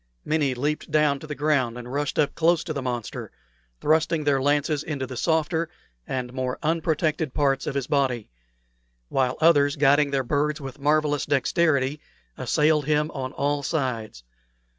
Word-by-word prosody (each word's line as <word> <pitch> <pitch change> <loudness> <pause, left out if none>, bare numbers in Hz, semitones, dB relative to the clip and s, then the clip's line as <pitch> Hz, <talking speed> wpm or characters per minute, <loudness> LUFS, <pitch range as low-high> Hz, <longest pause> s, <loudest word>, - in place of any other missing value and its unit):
Many 150 -4 +1
leaped 145 +5 -2
down 150 -2 +2
to 155 - -10
the 150 - -5
ground 140 -6 +1
and 125 +1 -8
rushed 145 0 -2 0.2
close 170 0 +3
up - - -9
to 160 - -3
the 140 - -3
monster, 120 -3 -4 0.5
thrusting 160 0 +2
their 140 -2 +2
lances 145 +1 +1
into 145 -4 -4
the 130 0 -8
softer 160 +3 0 0.4
and 125 -1 -3
more 130 -1 -2
unprotected 160 -2 0
parts 135 -2 +1
of 140 - -2
his 140 -2 -1
body; 130 -6 0 0.8
while 130 -1 0
others, 145 -3 +5
guiding 145 0 +4
their 135 -1 0
birds 145 +3 0
with 135 0 -8
marvellous 145 0 +1
dexterity, 145 -1 +1 0.3
assailed 150 -1 +2
him 150 +1 +1
on 130 -2 -4
all 145 +1 0
sides. 125 - -3
145 Hz, 160 wpm, -25 LUFS, 135-155 Hz, 0.8 s, others